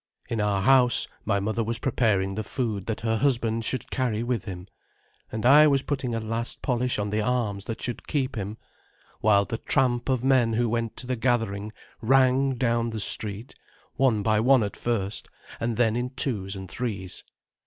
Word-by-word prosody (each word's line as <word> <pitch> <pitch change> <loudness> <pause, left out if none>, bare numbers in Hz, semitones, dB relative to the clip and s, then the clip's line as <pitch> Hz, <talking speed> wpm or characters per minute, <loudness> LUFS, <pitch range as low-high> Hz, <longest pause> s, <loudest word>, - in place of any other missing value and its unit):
In 115 -2 0
our 100 -2 +1
house 130 -1 +5 0.2
my 100 -2 +1
mother 110 +3 -1
was 115 +1 -2
preparing 100 -7 +1
the 110 +2 -3
food 105 -3 -3
that 110 - -3
her 110 0 0
husband 115 -4 +1
should 130 - -3
carry 120 -4 -1
with 120 -4 -2
him, 90 -3 -7 0.7
and 110 +1 -4
I 150 +4 +8
was 140 -2 +2
putting 130 -5 -2
a - - -1
last 115 +2 -3
polish 125 -1 0
on 105 0 -2
the 110 +1 0
arms 105 -4 -1
that 115 - -5
should 120 -2 -5
keep 135 -3 -1
him, 105 0 -4 0.6
while 100 -2 +4
the 115 +4 -4
tramp 125 -3 +1
of 130 -2 +1
men 130 -4 +3
who 120 +2 +1
went 115 0 -2
to - - -6
the 125 0 -1
gathering 110 -4 -1 0.3
rang 130 +2 +3
down 120 -2 +1
the 110 -1 -4
street, 105 +3 -3 0.4
one 120 -6 +2
by 110 0 +2
one 125 +1 +5
at 100 - -4
first, 110 -4 -2 0.3
and 115 -1 -2
then 115 -2 +2
in 125 +1 -1
twos 105 -7 -3
and 95 -1 -7
threes. 95 -1 -4
115 Hz, 185 wpm, -26 LUFS, 105-125 Hz, 0.7 s, I